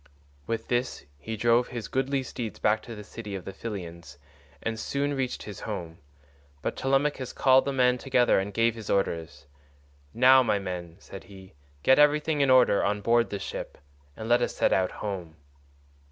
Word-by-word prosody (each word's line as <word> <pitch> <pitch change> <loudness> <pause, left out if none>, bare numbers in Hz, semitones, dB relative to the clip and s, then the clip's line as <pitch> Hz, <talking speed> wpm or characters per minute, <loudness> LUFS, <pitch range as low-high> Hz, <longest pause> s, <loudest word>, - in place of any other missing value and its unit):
With 115 -1 -3
this 120 - -2
he 110 +8 -5
drove 120 +2 +3
his 120 -4 -6
goodly 135 +1 -1
steeds 120 -3 -6
back 110 +1 +1
to 115 0 -9
the 105 - -9
city 105 -1 -8
of 95 - -7
the 95 - -7
Pylians 85 -9 -8 0.5
and 115 -1 -3
soon 140 +4 -1
reached 130 -2 -3
his 105 -2 -8
home, 85 -6 -6 0.6
but - - -2
Telemachus 135 -1 0
called 130 -1 +4
the 140 - -1
men 125 -2 +2
together 125 -5 +3
and 100 +1 -3
gave 115 +3 +2
his 110 -2 -9
orders. 80 -6 -2 0.7
"Now, 130 - +6
my 115 -4 +1
men," 90 -3 -6
said 95 -1 -11
he, 95 -1 -14 0.3
"get 130 +2 +5
everything 150 +1 +3
in 140 - +3
order 130 -5 +5
on 105 +1 0
board 115 +2 +2
the 100 - -3
ship, - - -6 0.4
and 110 - -6
let 120 +1 +4
us - - -1
set - - +2
out 95 -1 +2 0.2
home." 90 -6 -5
115 Hz, 180 wpm, -27 LUFS, 95-130 Hz, 0.7 s, Now